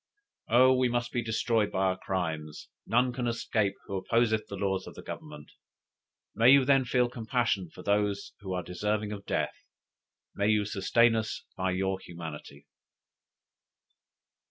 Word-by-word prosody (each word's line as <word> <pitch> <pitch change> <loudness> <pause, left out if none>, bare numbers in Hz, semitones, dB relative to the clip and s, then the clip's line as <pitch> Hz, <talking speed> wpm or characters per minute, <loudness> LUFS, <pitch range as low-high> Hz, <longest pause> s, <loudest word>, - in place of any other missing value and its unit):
Oh 130 +3 +6
we 130 -1 +2
must 120 0 -1
be 120 - -1
destroyed 110 -1 +1
by 95 - 0
our 95 -1 +2
crimes, 80 -5 -4 0.2
none 125 +2 +2
can 125 -1 -2
escape 110 -3 0
who 100 - -5
opposeth 110 +2 +1
the 100 - -6
laws 95 -1 -1
of - - -11
Government. 75 -1 -9 0.8
May 115 +2 +5
you 140 -2 +6
then 135 -1 +4
feel 125 0 +2
compassion 115 -6 -1
for 90 - -12
those 100 0 0
who 95 -2 -7
are 90 -1 -2
deserving 105 +4 -2
of 100 -1 -7
death; - - -1 0.8
may 100 - 0
you 105 -1 +3
sustain 115 +3 +3
us 110 -1 -3
by 95 0 -1
your 95 +1 -1
humanity!" 80 -5 -9
105 Hz, 150 wpm, -29 LUFS, 95-120 Hz, 0.8 s, Oh